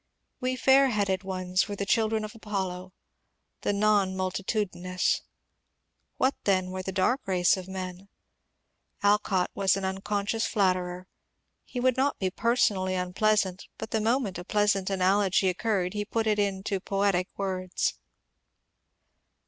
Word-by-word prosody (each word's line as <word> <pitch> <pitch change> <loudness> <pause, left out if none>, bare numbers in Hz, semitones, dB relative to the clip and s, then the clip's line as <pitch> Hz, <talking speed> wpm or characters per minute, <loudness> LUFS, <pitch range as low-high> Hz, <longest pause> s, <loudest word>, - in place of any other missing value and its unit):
We 255 0 -1
fair 270 +1 +5
headed 200 -5 0
ones 185 0 -1
were 205 - -4
the 200 - -3
children 220 +1 +1
of 210 - -8
ApoUo 190 -4 -4 0.4
— - - -50
the - - 0
non 200 -2 +2
multitudinous. 185 -1 -1 1.0
What 265 +2 +2
then 185 -2 +2
were 185 0 -4
the 190 - -4
dark 200 +8 +1
race 180 -2 +3
of 185 -1 -7
men? 190 0 -6 0.9
Alcott 205 -3 +2
was 195 -1 +2
an 195 - -3
unconscious 200 +3 -1
flatterer. 185 -2 0 0.6
He 250 - -5
would 255 0 +2
not 275 +2 +1
be 185 -1 -1
personally 200 -5 +1
unpleasant, 190 +1 0
but 220 - -7
the 220 - +1
moment 225 -5 0
a - - -6
pleasant 200 -1 +1
analogy 195 0 +2
occurred 185 -1 -1
he 210 0 -2
put 225 +2 -2
it 210 -1 +2
into 195 -1 -1
poetic 195 -2 0
words. 185 -2 -1
195 Hz, 140 wpm, -28 LUFS, 185-215 Hz, 1.0 s, fair